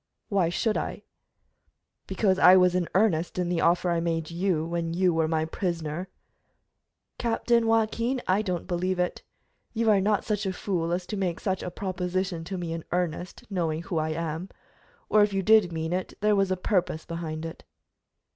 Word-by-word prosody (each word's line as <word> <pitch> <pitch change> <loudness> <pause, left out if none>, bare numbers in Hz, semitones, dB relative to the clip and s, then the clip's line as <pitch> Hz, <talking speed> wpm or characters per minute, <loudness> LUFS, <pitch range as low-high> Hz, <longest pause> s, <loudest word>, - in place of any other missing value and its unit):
"Why 190 -5 +2
should 215 +5 0
I?" - - -5 1.0
"Because 190 0 +1
I 185 +1 +8
was 180 -1 +5
in 180 -2 0
earnest 185 -5 +2
in 180 -1 0
the 175 -2 0
offer 175 +1 +3
I 170 - +1
made 165 -1 -2
you 170 -2 0
when 170 0 -2
you 180 -1 +3
were 160 -1 +1
my 160 0 0
prisoner." 170 0 -3 1.1
"Captain 235 0 +2
Joaquin, 225 +3 +1
I 190 +3 +3
don't 180 -5 -3
believe 180 +1 -1
it. 180 0 -1 0.5
You 225 -1 +3
are 200 -2 +4
not 205 +1 +1
such 210 -2 -1
a 190 - -1
fool 175 -3 -2
as 175 +1 -1
to 210 - -4
make 180 -4 -1
such 190 -2 -1
a - - -4
proposition 185 -1 -3
to 190 +2 -4
me 170 -2 -3
in 165 -1 -5
earnest, 175 0 -2
knowing 165 -3 -1
who 170 -2 -2
I 155 0 -1
am. 165 +3 -4 0.6
Or, 215 - +4
if 205 -1 +3
you 195 0 0
did 215 -3 +5
mean 160 +1 -2
it, 185 0 -3
there 210 0 +3
was 195 -1 +2
a 185 - 0
purpose 180 -4 0
behind 165 -2 -5
it." 165 - -8
180 Hz, 185 wpm, -27 LUFS, 165-195 Hz, 1.1 s, I